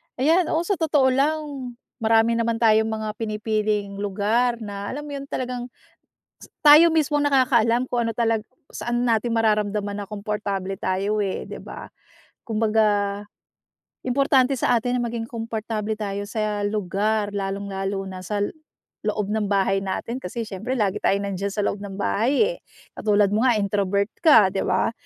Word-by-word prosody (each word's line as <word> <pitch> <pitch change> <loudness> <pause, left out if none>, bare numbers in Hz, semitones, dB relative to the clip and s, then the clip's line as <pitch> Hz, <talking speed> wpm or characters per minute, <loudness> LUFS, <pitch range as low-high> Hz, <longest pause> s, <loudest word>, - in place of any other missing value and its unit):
Ayan, 320 +6 +3
oh, 330 - +1
sa 375 0 -1
totoo 290 -5 +3
lang 280 -2 -1 0.2
marami 225 +1 +3
naman 230 0 0
tayong 220 -1 +4
mga 220 -1 -3
pinipiling 215 -2 -1
lugar 220 +5 0
na 200 -1 -6
alam 295 +2 -5
mo 295 - -8
'yon 275 0 -7
talagang 250 -2 -4 1.0
tayo 305 +3 +9
mismo 300 -2 +2
ang 290 - +2
nakakaalam 245 -3 +3
kung 235 -2 0
ano - - -1
talag 225 -2 +1 0.3
saan 240 +1 -2
natin 230 0 +1
mararamdaman 210 -2 0
na 200 - -6
komportable 200 -2 -3
tayo, 195 +3 0
eh, 195 -2 -2
di - - -7
ba? - - -9 0.6
Kumbaga, 210 -2 +1 0.8
importante 270 0 +3
sa 245 - +2
atin 245 +2 -1
na 240 - -1
maging 230 -1 -4
komportable 220 -2 -3
tayo 205 -1 -4
sa 215 -2 -2
lugar 205 +1 -1
lalong-lalo 195 0 -3
na 185 -1 -7
sa 205 +3 -2
l - - -2 0.5
loob 210 -1 -1
ng 210 -2 -1
bahay 195 0 +2
natin 195 +5 -3
kasi 230 -1 -5
syempre 225 +6 -4
lagi 200 -1 +1
tayong 200 +1 +1
nandiyan 200 +2 -3
sa 210 - -5
loob - - 0
ng 195 -1 -7
bahay, 280 - +1
eh. - - -15 0.4
Katulad 205 -2 +2
mo 225 - +2
nga 240 -4 +3
introvert 200 0 0 0.2
ka, 225 - +7
di 195 - -1
ba? 185 +4 +1
215 Hz, 160 wpm, -23 LUFS, 200-245 Hz, 1.0 s, tayo